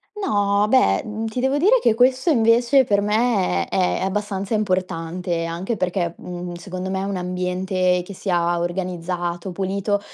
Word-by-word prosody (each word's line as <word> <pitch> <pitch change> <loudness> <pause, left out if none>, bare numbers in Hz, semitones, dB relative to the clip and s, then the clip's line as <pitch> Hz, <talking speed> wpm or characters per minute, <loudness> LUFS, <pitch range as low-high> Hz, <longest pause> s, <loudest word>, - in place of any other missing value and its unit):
No, 205 - +1
beh, 260 +2 +4
mhmm, 220 +1 -4
ti 225 +3 -4
devo 265 +3 +1
dire 415 +11 +4
che 225 - +3
questo 255 +6 +3
invece 240 +1 +4
per 205 -4 +1
me 210 - +1
è 185 -1 0
abbastanza 200 +1 -2
importante, 180 -4 -1
anche 175 +7 -3
perché, 180 -2 -1
mhmm, 175 0 -7
secondo 185 +2 -6
me 190 0 -2
un 200 0 -3
ambiente 180 0 0
che 200 - -9
sia 175 -2 0
organizzato, 175 0 -3
pulito, 200 +2 -1
190 Hz, 150 wpm, -22 LUFS, 180-215 Hz, -, beh